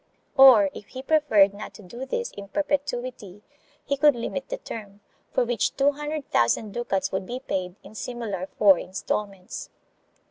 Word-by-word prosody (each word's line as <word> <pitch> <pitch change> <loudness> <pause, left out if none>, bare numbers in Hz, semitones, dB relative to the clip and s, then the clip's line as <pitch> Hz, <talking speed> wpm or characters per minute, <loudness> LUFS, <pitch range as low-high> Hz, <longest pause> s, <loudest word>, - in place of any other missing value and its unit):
Or, 250 -8 +8
if 205 - -10
he 260 0 -8
preferred 265 -11 +4
not 205 +1 -9
to 210 - -12
do 240 +8 -8
this 475 - -2
in 200 -1 -9
perpetuity, 250 -7 -3 0.4
he 280 - 0
could 295 -1 +5
limit 255 +3 -4
the - - -3
term, 205 - -9 0.3
for 250 - +2
which 230 -2 0
two 280 +1 +4
hundred 295 0 -5
thousand 120 - +2
ducats 200 -4 -1
would 190 0 -3
be 250 +1 -4
paid, 185 -8 -3
in - - -13
similar 215 -5 -4
four 195 -4 +6
instalments. 195 0 -4
230 Hz, 165 wpm, -25 LUFS, 200-275 Hz, 0.4 s, Or